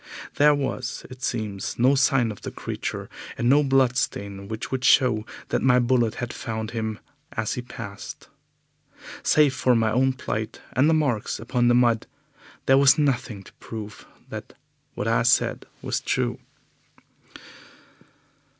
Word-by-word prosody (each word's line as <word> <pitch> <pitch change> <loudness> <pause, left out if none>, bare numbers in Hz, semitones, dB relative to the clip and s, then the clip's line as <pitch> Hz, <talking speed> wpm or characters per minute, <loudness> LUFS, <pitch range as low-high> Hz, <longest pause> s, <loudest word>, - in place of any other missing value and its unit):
There 150 0 +6
was, 130 -3 -3
it 130 0 -11
seems, 110 -5 -3
no 130 +3 +4
sign 135 -4 +3
of 105 - -10
the - - -5
creature, - - -5 0.3
and 120 - 0
no 140 +4 +6
bloodstain 125 -7 0
which 110 +1 -5
would 130 -1 -2
show 120 -6 +4 0.2
that - - 0
my 125 -1 +4
bullet 120 -2 +2
had 120 -1 -4
found 110 -1 -4
him 110 -2 -3 0.4
as 110 -1 -1
he 125 - -3
passed. 100 -4 -9 0.9
Save 150 -3 +4
for 125 -2 +2
my 110 -1 +2
own 130 +3 +2
plight 110 -3 -4
and 130 +6 +4
the 160 - +4
marks 135 -9 0
upon 120 +1 0
the 120 - +5
mud, 120 -2 +3 0.6
there 135 0 +5
was 140 +2 +6
nothing 125 -8 0
to - - -16
prove 105 -3 -8 0.2
that - - -8 0.4
what - - -3
I - - +3
said - - +2 0.2
was - - -1
true. - - -1
120 Hz, 150 wpm, -24 LUFS, 110-130 Hz, 0.9 s, There